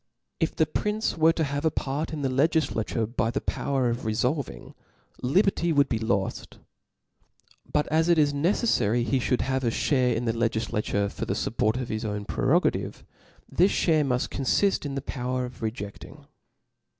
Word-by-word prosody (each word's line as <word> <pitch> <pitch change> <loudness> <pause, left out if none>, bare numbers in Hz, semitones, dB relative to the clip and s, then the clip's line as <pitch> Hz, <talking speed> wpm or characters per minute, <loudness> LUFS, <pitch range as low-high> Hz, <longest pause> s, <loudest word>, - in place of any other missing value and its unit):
If 160 - 0
the 160 - +3
prince 210 +7 -1
were 160 0 +5
to 165 - 0
have 145 0 -2
a 160 - +4
part 145 +2 -3
in 150 -3 -4
the 135 - +1
Icgifla. 140 -4 +1
tore 115 - -1
by 115 0 -1
the - - -1
power 135 -3 -1
of 120 +1 -2
refolving, 120 - -2 0.5
liberty 170 +5 +2
would 140 -3 +3
be 115 - 0
loft. 100 -4 -2 1.1
But 150 - +2
as 160 +2 +3
it 170 - +5
is 145 -2 +3
neceflary 140 - +1
he 135 +1 +1
fhould 125 0 0
have 130 0 -1
a - - +1
fhare 125 0 +1
in 120 +2 -2
the 115 - +1
legiflature 110 -3 -1
for - - -4
the - - -2
fupport 115 +1 0
of 125 - -4
his 110 0 -3
own 105 -1 -3
pre - - -3
rogative, - - +1 0.4
this 185 +4 +3
fhare 155 -3 +3
muft 125 -3 0
confift 150 +6 +1
in 140 - -5
the 135 - -3
power 125 -2 -2
(^ - - -13
rcjcfting. 110 -2 -7
130 Hz, 180 wpm, -26 LUFS, 115-155 Hz, 1.1 s, were